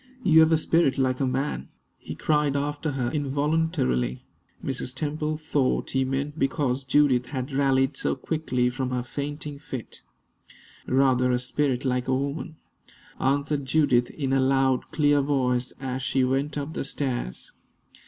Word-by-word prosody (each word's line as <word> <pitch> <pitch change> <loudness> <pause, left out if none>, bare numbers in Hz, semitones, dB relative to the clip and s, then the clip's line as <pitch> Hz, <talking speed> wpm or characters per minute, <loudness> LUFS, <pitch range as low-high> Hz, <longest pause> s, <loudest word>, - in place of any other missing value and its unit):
"You 160 -5 +6
have 160 0 +6
a 160 - +5
spirit 155 -3 +2
like 130 -1 +1
a 135 - +1
man!" 135 +3 -2 0.3
he - - -7
cried 150 -2 +1
after 145 +1 -2
her, 125 -3 -1
involuntarily. 140 - 0 0.4
Mrs. 130 -1 -3
Temple 150 +1 -2
thought 145 -4 0
he 135 0 +2
meant 140 +3 -3
because 135 -1 0
Judith 130 -2 +3
had 130 0 -4
rallied 135 0 +2
so - - -1
quickly 130 -4 -1
from 130 +1 -3
her 125 -1 -2
fainting 145 +2 -5
fit. 130 -5 -7 0.9
"Rather 130 -1 +3
a 125 - +2
spirit 130 +1 -1
like 125 -1 0
a 130 - +2
woman!" 140 +4 -4 0.6
answered 140 +1 0
Judith, 130 -4 +3
in 135 -3 -2
a 135 - +3
loud, 135 -1 +2
clear 145 -2 +3
voice, 130 -3 0
as 130 -1 -3
she 130 0 +1
went 135 +3 0
up 145 +2 -4
the - - -3
stairs. 130 - -3
135 Hz, 155 wpm, -26 LUFS, 130-145 Hz, 0.9 s, You